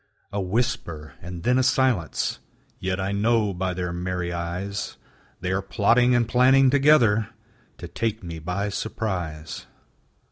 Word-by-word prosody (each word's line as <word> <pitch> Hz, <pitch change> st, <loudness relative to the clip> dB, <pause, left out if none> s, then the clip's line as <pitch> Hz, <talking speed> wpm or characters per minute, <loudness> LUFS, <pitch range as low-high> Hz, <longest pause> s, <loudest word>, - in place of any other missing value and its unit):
A 100 Hz, -, -1 dB
whisper, 90 Hz, -, -2 dB
and 85 Hz, 0 st, -7 dB
then 125 Hz, +2 st, +3 dB
a -, -, +4 dB
silence: 130 Hz, -9 st, +1 dB, 0.4 s
Yet 95 Hz, 0 st, -2 dB
I 95 Hz, +1 st, -1 dB
know 105 Hz, 0 st, +2 dB
by 90 Hz, 0 st, -2 dB
their 90 Hz, -1 st, -3 dB
merry 90 Hz, 0 st, -3 dB
eyes 90 Hz, +4 st, -4 dB, 0.4 s
They 90 Hz, +1 st, -2 dB
are 95 Hz, +1 st, 0 dB
plotting 115 Hz, +6 st, +3 dB
and 120 Hz, -2 st, +2 dB
planning 130 Hz, +3 st, +5 dB
together 130 Hz, -7 st, +4 dB, 0.5 s
To -, -, -7 dB
take 110 Hz, -2 st, -2 dB
me 85 Hz, -2 st, -6 dB
by 90 Hz, +6 st, -2 dB
surprise. 90 Hz, -8 st, -4 dB
100 Hz, 140 wpm, -24 LUFS, 90-120 Hz, 0.5 s, planning